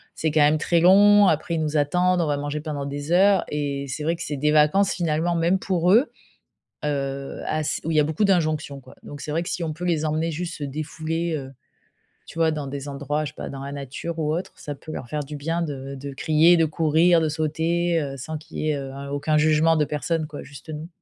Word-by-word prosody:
c'est 160 -1 -1
quand 155 0 +3
même 150 +1 +5
très 170 +1 +2
long. 205 +3 +7
Après, 160 +1 +1
ils 160 - -1
nous 155 0 -1
attendent, 180 +4 +2
on 160 - 0
va 145 -1 0
manger 145 +1 -3
pendant 145 -2 -4
des 145 +2 -5
heures 195 +2 +5
et 140 -1 -2
c'est 150 +4 -4
vrai 165 +2 +1
que 170 - -6
c'est 145 - -4
des 150 +2 +1
vacances 155 +6 +4
finalement, 170 0 0
même 170 +3 +2
pour 180 -2 +1
eux. 240 +8 +4 0.7
Heu, 140 -2 -3
ass 155 -1 -1
où 165 - -2
il 155 - +1
y - - +7
a 150 - +5
beaucoup 160 +7 -1
d'injonctions 155 -6 0
quoi. 130 - -16
Donc 145 -1 -9
c'est - - -7
vrai 165 +3 0
que - - -6
si 180 - -3
on 160 - -2
peut 175 +4 -6
les 160 -3 +1
emmener 155 +2 0
juste 170 +2 -4
se 150 - -6
défouler, 160 +3 -3
heu, 135 -2 -6 0.7
tu 165 - -9
vois 165 -1 +4
dans 150 -2 -3
des 140 +1 -6
endroits, 145 +2 -2
je 150 - -3
sais - - -19
pas, - - -6
dans 135 -1 -7
la 140 - -6
nature 145 +4 -6
ou 155 -1 0
autre. 175 +3 -3
Ça 145 - -6
peut 150 +3 -10
leur 125 - -6
faire 150 - -3
du 150 +2 -8
bien 165 +4 -2
de 140 -4 -5
de 140 +1 -7
crier, 160 +5 +4
de 165 - +4
courir, 165 +2 +3
de 155 - +1
sauter, 165 +2 0
heu, 140 -1 -4
sans 155 +4 -5
qu'il 155 - -11
y 155 - 0
ait, 145 - -1
heu, 135 -1 -6
un 140 0 -7
aucun 150 +2 0
jugement 155 +1 +4
de 150 -2 +2
personne 155 +2 -2
quoi, 150 -1 -8
juste 140 +2 -13
nous. 155 +2 -6
155 Hz, 250 wpm, -24 LUFS, 145-165 Hz, 0.7 s, long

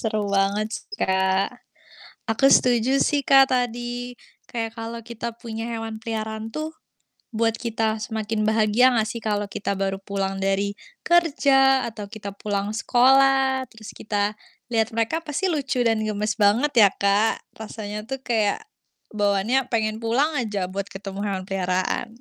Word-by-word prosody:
seru 215 -2 -1 0.2
banget 200 +2 +1
sih, - - -13
Kak. 190 +1 +2 0.8
Aku 225 +5 +3
setuju 245 -2 +4 0.2
sih, 290 - +1
Kak, 270 0 +8
tadi 245 0 -2 0.3
kayak 225 -2 -3
kalau 230 +1 -5
kita 235 0 -4
punya 225 -1 -5
hewan 225 -1 -5
peliharaan 220 -1 -4
tuh 310 +1 -3 0.7
buat 225 0 +2
kita 225 -1 0 0.2
semakin 220 -1 -3
bahagia 220 +2 +3
enggak 230 -4 +1
sih 235 - -6
kalau 205 -2 -1
kita 200 0 -3
baru 195 0 -1
pulang 195 -1 -3
dari 195 +1 0 0.3
kerja 270 -6 +4
atau 215 -2 -8
kita 200 -2 -7
pulang 200 +1 -3
sekolah, 265 +2 +4
terus 220 -1 -12
kita 205 -1 -1 0.4
lihat 225 -1 +2
mereka 230 +9 0
pasti 320 +4 -3
lucu 275 -6 -1
dan 225 -1 +2
gemas 210 0 -1
banget 225 +7 +3
ya, - - +5
Kak? 200 +2 +2 0.2
Rasanya 215 -1 -6
tuh 270 -1 -4
kayak 220 - 0 0.5
bawaannya 205 +5 +1
pengen 215 -1 0
pulang 265 +8 +1
aja 210 -7 -1
buat 195 +1 -3
ketemu 195 0 -7
hewan 195 -2 -2
peliharaan. 185 +4 -1
220 Hz, 145 wpm, -23 LUFS, 205-245 Hz, 0.8 s, Kak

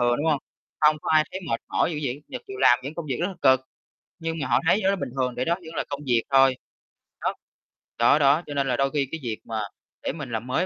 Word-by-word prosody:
thường, 120 0 +3
đúng 150 - -2
hông? 150 -3 +3 0.4
Không 150 0 +5
có - - -2
ai 155 0 +5
thấy 190 - -4
mệt 115 - 0
mỏi - - +1
dữ 150 - -3
vậy, 135 +2 -3
nhật - - -6
chịu 400 0 -8
làm 120 - +6
những 140 +4 -6
công 170 -2 -5
việc 130 -4 -2
rất 175 - +1
là 195 - -7
cực, 130 -1 +6 0.6
nhưng 165 0 -3
mà 140 - -2
họ - - +3
thấy 190 - +5
điều 190 - +2
đó - - +1
bình 180 - -4
thường, 125 -1 0
tại 125 - -1
đó 170 - +2
vẫn 165 -3 -11
là - - 0
công 140 0 -4
việc 120 -3 +2
thôi. 135 -1 +5 0.6
Đó. - - 0 0.6
Đó, 120 +6 +5
đó, 145 +3 +5
cho 145 - -5
nên 140 -1 0
là 125 - +1
đôi 135 0 +1
khi 140 -2 0
cái 165 - -4
việc 115 -3 -3
mà 110 -1 -3 0.4
để - - -1
mình 140 -6 -7
làm 115 +2 -3
mới 130 +8 +1
140 Hz, 280 wpm, -25 LUFS, 125-160 Hz, 0.6 s, làm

